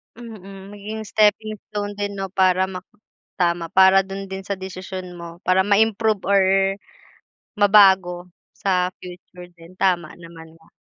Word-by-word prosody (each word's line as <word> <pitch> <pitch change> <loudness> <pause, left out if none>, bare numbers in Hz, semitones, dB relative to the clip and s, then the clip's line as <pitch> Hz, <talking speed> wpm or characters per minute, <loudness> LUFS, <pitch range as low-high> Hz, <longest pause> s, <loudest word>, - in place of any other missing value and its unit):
Mm, 200 -4 -11
maging 210 +2 -7
stepping 215 0 +1
stone 205 -1 -5
din 205 0 -3
'no, 195 -1 -5
para 185 0 +2
ma 185 -1 -7 0.5
tama 170 -2 0
para 190 0 +5
do'n 195 0 -7
din 190 0 -7
sa 200 - -2
desisyon 185 -1 -8
mo 170 0 -11
para 190 +1 +2
ma-improve 215 0 +2
or, 200 -1 +4 1.2
mabago 190 -4 +4 0.2
sa 185 -2 -1
future 180 0 -12
din, 165 +2 -16
tama 175 -4 +1
naman 165 -1 -13
nga. 160 - -24
190 Hz, 140 wpm, -21 LUFS, 180-205 Hz, 1.2 s, para